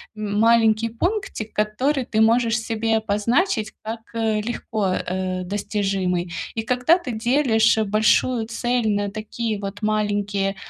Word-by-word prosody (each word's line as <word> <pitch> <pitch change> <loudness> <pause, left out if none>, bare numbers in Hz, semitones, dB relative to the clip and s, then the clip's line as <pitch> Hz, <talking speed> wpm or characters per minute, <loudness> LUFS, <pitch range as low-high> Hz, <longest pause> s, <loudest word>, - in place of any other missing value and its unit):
м, 210 -1 -3
маленький 225 0 +4
пунктик, 350 - -3
который 255 +7 0
ты 220 -3 -1
можешь 230 +1 +3
себе 225 0 0
обозначить 220 - 0
как, 225 +1 -5
э, 220 -2 0
легко, 220 -2 -3
э, 185 0 -3
достижимый. 190 -2 -2 0.2
И 225 - -2
когда 250 +8 +3
ты 275 -9 -6
делишь 230 -1 +3
большую 220 +2 +2
цель 240 0 0
на 205 -1 0
такие 215 +1 -4
вот 200 0 -6
маленькие 205 -2 0
220 Hz, 130 wpm, -22 LUFS, 205-235 Hz, 0.2 s, маленький